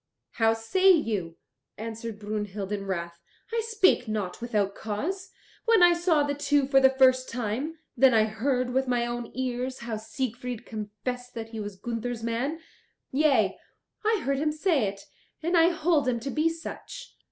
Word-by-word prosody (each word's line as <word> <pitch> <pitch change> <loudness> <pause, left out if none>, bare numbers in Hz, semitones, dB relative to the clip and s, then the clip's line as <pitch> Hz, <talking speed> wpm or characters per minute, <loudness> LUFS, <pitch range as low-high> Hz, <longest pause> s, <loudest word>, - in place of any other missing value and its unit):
"How 225 -1 +2
say 370 +13 +3
you?" 210 - 0 0.4
answered 225 0 -6
Brunhild 210 -1 -4
in 200 -1 -3
wrath; 170 -2 -4 0.3
"I 460 - +2
spake 420 - +3
not 210 -3 -3
without 210 -4 0
cause. 345 - -4 0.4
When 455 -6 +5
I 350 0 +8
saw 340 -3 +2
the 285 0 -1
two 290 -1 +2
for 270 0 +5
the 265 0 +6
first 260 -1 +4
time, 250 +7 -3 0.2
then 265 +1 +6
I 220 -2 +5
heard 250 +4 0
with 265 0 +1
my 245 -1 +1
own 240 -1 -4
ears 255 0 -3
how 235 -2 -3
Siegfried 245 +1 -4
confessed 245 +4 -6
that 225 -1 -5
he 225 -1 -6
was 205 -1 -5
Gunther's 230 +2 -4
man. 245 +8 -1 0.5
Yea, 265 -8 +3 0.4
I 435 -2 +2
heard 275 0 0
him 305 +1 +1
say 305 - +1
it, 195 0 -6 0.4
and 345 +2 +1
I 335 0 +6
hold 325 -4 +1
him 240 -2 +1
to 275 +3 -4
be 310 +4 +2
such." 335 +9 -8
250 Hz, 170 wpm, -27 LUFS, 220-295 Hz, 0.5 s, I